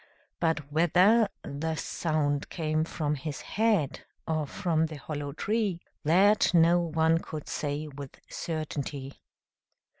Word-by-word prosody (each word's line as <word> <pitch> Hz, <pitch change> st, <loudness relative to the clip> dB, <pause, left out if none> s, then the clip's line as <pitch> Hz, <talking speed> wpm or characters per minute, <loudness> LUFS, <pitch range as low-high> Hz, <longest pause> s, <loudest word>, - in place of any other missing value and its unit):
But 160 Hz, -4 st, 0 dB
whether 180 Hz, +8 st, +4 dB
the 160 Hz, +3 st, -3 dB
sound 150 Hz, -3 st, -1 dB
came 155 Hz, -2 st, 0 dB
from 150 Hz, -2 st, -2 dB
his 145 Hz, 0 st, -5 dB
head 205 Hz, -11 st, +1 dB, 0.3 s
or 155 Hz, -2 st, 0 dB
from 160 Hz, -2 st, 0 dB
the 155 Hz, -, -8 dB
hollow 145 Hz, 0 st, -5 dB
tree, 205 Hz, +1 st, -1 dB, 0.2 s
that 190 Hz, +5 st, +4 dB
no 170 Hz, +1 st, +6 dB
one 160 Hz, -1 st, +2 dB
could 155 Hz, -3 st, -7 dB
say 150 Hz, +1 st, -3 dB
with 140 Hz, -2 st, -9 dB
certainty. 145 Hz, -4 st, -5 dB
160 Hz, 120 wpm, -29 LUFS, 145-170 Hz, 0.3 s, no